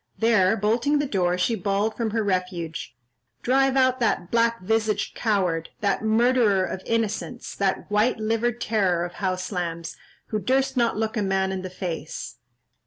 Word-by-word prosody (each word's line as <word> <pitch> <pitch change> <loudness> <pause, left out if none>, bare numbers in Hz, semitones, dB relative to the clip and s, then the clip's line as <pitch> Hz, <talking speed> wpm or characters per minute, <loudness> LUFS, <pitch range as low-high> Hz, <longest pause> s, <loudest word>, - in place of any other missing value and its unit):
There, 220 -3 +3
bolting 230 +8 +2
the 290 - +1
door, 180 -7 0
she 180 +6 +1
bawled 205 +1 0
from 230 -2 -1
her 220 +1 0
refuge, 180 - -3 0.5
"Drive 270 +1 +3
out 260 -1 +3
that 200 -6 0
black 230 0 +2
visaged 220 +2 0
coward, 185 -7 0
that 200 -2 +1
murderer 220 -3 +3
of 185 - -5
innocents, 230 +2 -2
that 195 -1 0
white 210 +4 +2
livered 225 +2 0
terror 190 -7 +1
of 175 - -8
house 185 0 -2
lambs, 170 -3 -4 0.3
who 215 - -1
durst 265 +6 +1
not 235 -3 +1
look 220 +1 -1
a - - +1
man 190 -1 0
in 190 -1 -3
the 185 - -6
face." 175 -4 -5
210 Hz, 165 wpm, -24 LUFS, 185-230 Hz, 0.5 s, There